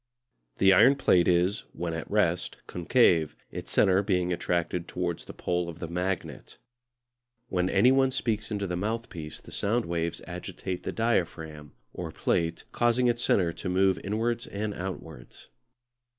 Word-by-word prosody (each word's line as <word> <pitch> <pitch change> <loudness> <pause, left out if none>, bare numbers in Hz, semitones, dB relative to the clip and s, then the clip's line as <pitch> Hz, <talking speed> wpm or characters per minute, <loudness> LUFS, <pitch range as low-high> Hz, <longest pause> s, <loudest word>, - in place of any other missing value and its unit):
The 95 0 +6
iron 130 +9 +7
plate 90 -10 +3
is, 90 +3 +2
when 85 -1 -3
at 80 - -5
rest, 90 -4 +1
concave, 85 - +2 0.2
its - - -6
centre 95 0 +4
being 90 -3 0
attracted 85 0 -1
towards 85 -2 -3
the - - -8
pole 90 -1 -2
of 80 - -8
the 85 - -5
magnet. 90 +2 -4 0.9
When 90 0 0
any 100 +6 +5
one 135 0 +4
speaks 110 -4 -2
into 100 -2 -2
the 90 -2 -3
mouthpiece 100 -6 -4
the - - -14
sound 115 +4 0
waves 85 -1 -2
agitate 90 +1 -5
the - - -1
diaphragm 80 - -2 0.2
(or 85 -3 -5
plate), 85 +1 -1
causing 120 +1 +2
its 120 0 0
centre 85 -8 +2
to 90 - -5
move 95 -1 +3
inwards 115 +4 -1
and 105 +1 -3
outwards. 85 -8 -8
90 Hz, 150 wpm, -28 LUFS, 85-105 Hz, 0.9 s, iron